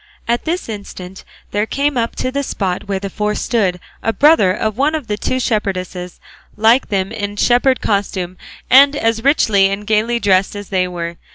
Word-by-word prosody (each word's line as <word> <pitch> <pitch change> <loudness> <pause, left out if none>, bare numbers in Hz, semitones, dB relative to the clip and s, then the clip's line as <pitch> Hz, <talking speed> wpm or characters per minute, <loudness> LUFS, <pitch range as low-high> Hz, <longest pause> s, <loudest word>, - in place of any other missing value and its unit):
At 235 +1 0
this 345 +3 -2
instant 195 -3 -8 0.3
there 210 +1 0
came 285 +3 0
up 230 -1 -1
to 255 - -2
the 280 +2 -1
spot 195 -8 -3
where 200 -1 -1
the 195 +1 -4
four 210 0 -1
stood 195 -7 0 0.2
a 225 - 0
brother 285 - +4
of 215 +2 -2
one 290 +6 +1
of 305 -5 -4
the 210 - -2
two 255 +4 -2
shepherdesses, 185 -6 -3 0.4
like 225 +4 +3
them 195 -1 -1
in 205 -2 -4
shepherd 245 +4 +2
costume, 190 -3 -1 0.3
and 280 +3 +6
as 225 -4 0
richly 220 -8 +4
and 200 +1 -4
gaily 220 +3 +1
dressed 195 -2 +2
as 205 -1 -8
they 185 -2 +1
were. 170 -1 -5
210 Hz, 185 wpm, -17 LUFS, 195-245 Hz, 0.4 s, and